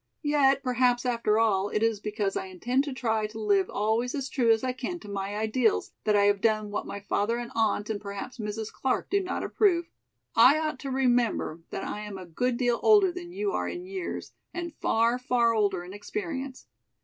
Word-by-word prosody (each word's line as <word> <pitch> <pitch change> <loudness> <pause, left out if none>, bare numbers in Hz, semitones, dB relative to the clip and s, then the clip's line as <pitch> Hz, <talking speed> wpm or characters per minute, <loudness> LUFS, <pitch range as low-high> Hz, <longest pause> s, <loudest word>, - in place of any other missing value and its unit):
"Yet 280 -2 +3
perhaps 250 -1 +2
after 230 -3 +1
all 205 -3 +2
it 215 - 0
is 225 -2 +1
because 210 -1 -2
I - - -3
intend 245 +9 0
to 285 - -4
try 225 -4 0
to 220 +1 -9
live 200 -3 +2
always 220 +5 0
as 275 -2 -3
true 240 -4 +1
as 225 +1 +2
I 255 -1 0
can 265 +7 -4
to - - -11
my 200 0 -4
ideals 220 +1 +1
that 210 -1 +3
I 200 - +5
have 205 -1 +3
done 215 -2 +1
what 205 - -3
my 200 - -5
father 205 +3 0
and 240 0 -5
aunt 215 -2 +1
and 205 - -4
perhaps 200 +5 -7
Mrs. 215 0 -4
Clark 265 - -1
do 400 0 +3
not 370 -1 -3
approve. 345 -5 +2 0.4
I 250 +6 +7
ought 310 -3 -2
to 275 - -5
remember 245 -10 +1
that - - -4
I - - -4
am 210 -2 -6
a 185 - -8
good 235 +9 -1
deal 240 -2 +1
older 410 -4 +6
than 350 0 -8
you 400 +2 -2
are - - -1
in 355 +1 -6
years 375 -1 -5 0.2
and 345 -2 -4
far, 230 +2 +1
far 240 -2 +2
older 200 -5 +1
in 180 +2 -9
experience. 275 - -5
235 Hz, 210 wpm, -28 LUFS, 210-270 Hz, 0.4 s, I